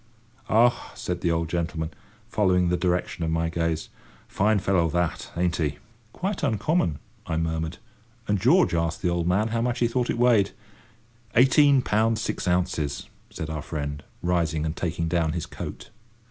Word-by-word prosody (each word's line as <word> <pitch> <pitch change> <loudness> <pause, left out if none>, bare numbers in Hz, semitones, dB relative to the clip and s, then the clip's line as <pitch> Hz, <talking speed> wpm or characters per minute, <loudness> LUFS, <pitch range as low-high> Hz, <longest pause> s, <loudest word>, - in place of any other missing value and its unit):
"Ah!" 120 +2 +3
said 90 -1 -4
the 85 - +1
old 85 0 0
gentleman, 80 -1 -2 0.4
following 90 -6 +2
the 90 - +2
direction 90 -1 -1
of 80 - 0
my 80 0 0
gaze, 80 -1 -1 0.4
"fine 105 +2 +2
fellow 90 -4 +2
that, 85 +1 -1
ain't 90 0 +1
he?" 75 -3 -1 0.3
"Quite 190 - -3
uncommon," 110 - +1 0.3
I 80 - -1
murmured; 80 0 -2 0.5
and 105 -1 +1
George 85 - +4
asked 85 -1 -1
the 90 - +2
old 85 -1 0
man 100 +5 +2
how 115 +1 0
much 120 0 0
he 120 - +2
thought 120 +1 -1
it - - 0
weighed. 120 -5 +4 0.8
"Eighteen 135 +2 +6
pounds 110 +1 +2
six 110 - -3
ounces," 80 -5 -1 0.2
said 80 0 -5
our 75 -1 -3
friend, 70 -2 -4 0.2
rising 85 -3 +1
and 80 +1 -2
taking 85 -1 -2
down 80 -2 +1
his 85 -2 -3
coat. - - -8
90 Hz, 165 wpm, -25 LUFS, 80-110 Hz, 0.8 s, Eighteen